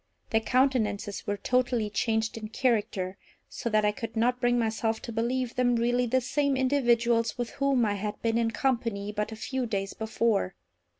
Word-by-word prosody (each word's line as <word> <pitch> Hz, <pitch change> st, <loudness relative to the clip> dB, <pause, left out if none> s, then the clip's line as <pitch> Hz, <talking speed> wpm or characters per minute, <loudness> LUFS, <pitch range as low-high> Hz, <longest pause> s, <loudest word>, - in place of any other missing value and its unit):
Their 220 Hz, -, +3 dB
countenances 220 Hz, -4 st, 0 dB
were 205 Hz, 0 st, -1 dB
totally 245 Hz, 0 st, +1 dB
changed 220 Hz, +1 st, 0 dB
in 220 Hz, -1 st, -6 dB
character, 205 Hz, -6 st, 0 dB, 0.3 s
so 235 Hz, -, -4 dB
that 215 Hz, -1 st, +3 dB
I 210 Hz, -, +4 dB
could 225 Hz, 0 st, -6 dB
not 245 Hz, +2 st, +1 dB
bring 245 Hz, -1 st, +3 dB
myself 225 Hz, -1 st, 0 dB
to 235 Hz, -, -5 dB
believe 240 Hz, +2 st, -1 dB
them 245 Hz, -1 st, +2 dB
really 245 Hz, +1 st, +1 dB
the 260 Hz, +2 st, +2 dB
same 275 Hz, +2 st, 0 dB
individuals 240 Hz, -4 st, +2 dB
with 240 Hz, -2 st, -3 dB
whom 275 Hz, -4 st, +2 dB
I 205 Hz, -, +1 dB
had 205 Hz, +1 st, -4 dB
been 230 Hz, 0 st, +2 dB
in 230 Hz, -1 st, +2 dB
company 225 Hz, -5 st, -1 dB
but 210 Hz, +1 st, -2 dB
a -, -, -5 dB
few 255 Hz, +3 st, -3 dB
days 195 Hz, -3 st, -2 dB
before. 220 Hz, -, 0 dB
230 Hz, 180 wpm, -28 LUFS, 215-250 Hz, 0.3 s, I